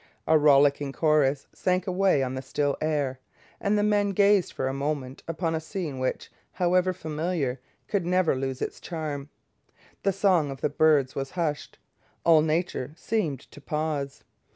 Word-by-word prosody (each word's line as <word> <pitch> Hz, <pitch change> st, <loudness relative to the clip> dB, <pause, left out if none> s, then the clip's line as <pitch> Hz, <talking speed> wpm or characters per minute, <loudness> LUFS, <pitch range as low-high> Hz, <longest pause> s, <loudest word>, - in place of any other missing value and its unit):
A 160 Hz, -, +4 dB
rollicking 145 Hz, -1 st, +4 dB
chorus 145 Hz, -3 st, +2 dB
sank 185 Hz, 0 st, 0 dB
away 185 Hz, -6 st, +2 dB
on 130 Hz, 0 st, -3 dB
the 130 Hz, -, -4 dB
still 140 Hz, +1 st, -1 dB
air, 145 Hz, -4 st, -1 dB, 0.4 s
and 205 Hz, +1 st, +1 dB
the 205 Hz, -, +2 dB
men 205 Hz, -1 st, +2 dB
gazed 200 Hz, -1 st, +4 dB
for 130 Hz, -, -2 dB
a 135 Hz, -, -2 dB
moment 140 Hz, -2 st, -3 dB
upon 165 Hz, 0 st, -2 dB
a 160 Hz, -, 0 dB
scene 160 Hz, -4 st, -5 dB
which, 130 Hz, -, -3 dB, 0.2 s
however 180 Hz, 0 st, +2 dB
familiar, 155 Hz, -5 st, -2 dB, 0.3 s
could 200 Hz, -4 st, 0 dB
never 180 Hz, -3 st, +2 dB
lose 135 Hz, 0 st, -3 dB
its -, -, -5 dB
charm. 150 Hz, -4 st, -5 dB, 0.7 s
The 195 Hz, -, +2 dB
song 185 Hz, -6 st, +2 dB
of 135 Hz, 0 st, -7 dB
the -, -, +1 dB
birds 145 Hz, -3 st, +3 dB
was 135 Hz, 0 st, -3 dB
hushed. 160 Hz, -4 st, -3 dB, 0.5 s
All 165 Hz, -2 st, +6 dB
nature 155 Hz, -3 st, -1 dB
seemed 170 Hz, -, -1 dB
to 145 Hz, -, -13 dB
pause. 150 Hz, -1 st, -3 dB
155 Hz, 160 wpm, -26 LUFS, 140-180 Hz, 0.7 s, All